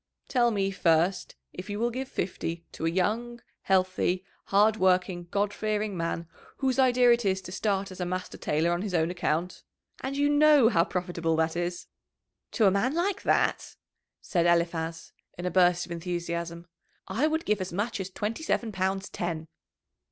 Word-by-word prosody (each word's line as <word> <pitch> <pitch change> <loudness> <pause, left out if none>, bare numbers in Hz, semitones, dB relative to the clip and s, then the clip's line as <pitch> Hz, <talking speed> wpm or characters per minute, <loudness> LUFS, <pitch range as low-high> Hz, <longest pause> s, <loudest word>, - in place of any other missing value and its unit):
"Tell 245 -3 +3
me, 195 -3 0
first, 175 0 +1 0.2
if 180 +4 -8
you 205 - -3
will 235 +2 0
give 260 +2 -4
fifty 170 -5 -4
to 165 - -3
a - - +3
young, 225 +7 -1 0.2
healthy, 185 -1 +1 0.2
hard 210 +2 +3
working, 180 -2 +1
God 205 +2 0
fearing 215 -1 -2
man, 165 -1 -3 0.3
whose 265 -1 0
idea 250 -2 +5
it 235 0 +3
is 190 -2 +1
to 180 - -8
start 195 0 -1
as 185 - -10
a 180 - -1
master 185 +1 -4
tailor 160 +3 +1
on 175 +1 0
his 195 -3 -3
own 165 +1 +2
account? 175 0 -2 0.4
And 275 +1 -3
you 285 0 +3
know 290 -4 +6
how 170 -7 +3
profitable 175 -3 -1
that 160 +1 0
is!" 175 0 -3 0.7
"To 225 - +3
a 195 - +6
man 235 +9 +1
like 380 +3 0
that," - - +1 0.5
said 170 -2 +1
Eliphaz, 170 -1 0 0.2
in 175 - -5
a 180 - -1
burst 175 0 +3
of - - -13
enthusiasm, 170 0 -4 0.4
"I 230 +11 +1
would 320 +1 -1
give 210 -2 +1
as 185 - -4
much 205 +5 -2
as 190 0 -4
twenty 210 +7 -4
seven 235 -7 -1
pounds 190 0 -1
ten!" 165 -2 -4
185 Hz, 180 wpm, -28 LUFS, 175-220 Hz, 0.7 s, know